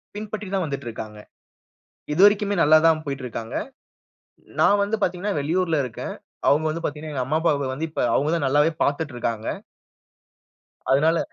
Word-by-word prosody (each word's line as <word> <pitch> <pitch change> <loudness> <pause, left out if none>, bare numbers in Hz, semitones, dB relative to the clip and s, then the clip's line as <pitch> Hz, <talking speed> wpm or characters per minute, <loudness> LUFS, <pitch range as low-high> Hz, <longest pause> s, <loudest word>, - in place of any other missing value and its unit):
பின்பற்றி 210 0 -5
தான் 190 -2 +1
வந்துட்டு 140 -4 -5
இருக்காங்க. 110 -1 -8 0.9
இதுவரைக்குமே 205 +3 +4
நல்லா 155 0 +7
தான் 155 -1 +2
போயிட்டு 135 -2 -4
இருக்காங்க. 115 0 -6 1.0
நான் 205 - +5
வந்து 205 +2 0
பார்த்தீங்கன்னா, 185 +1 -1
வெளியூர்ல 165 +2 0
இருக்கேன். 120 - -6 0.4
அவுங்க 150 +2 +3
வந்து 165 +2 -3
பார்த்தீங்கன்னா, 150 0 -4
எங்க 130 - 0
அம்மா, 155 +5 0
அப்பாவ 145 -5 +1
வந்து 160 +4 -3
இப்ப 155 - -3
அவுங்க 150 +3 +1
தான் 150 -5 0
நல்லாவே 145 +4 +3
பார்த்துட்டு 145 0 -1
இருக்காங்க. 115 -2 -3 1.4
அதனால, 160 +5 +3
155 Hz, 150 wpm, -23 LUFS, 140-175 Hz, 1.4 s, நல்லா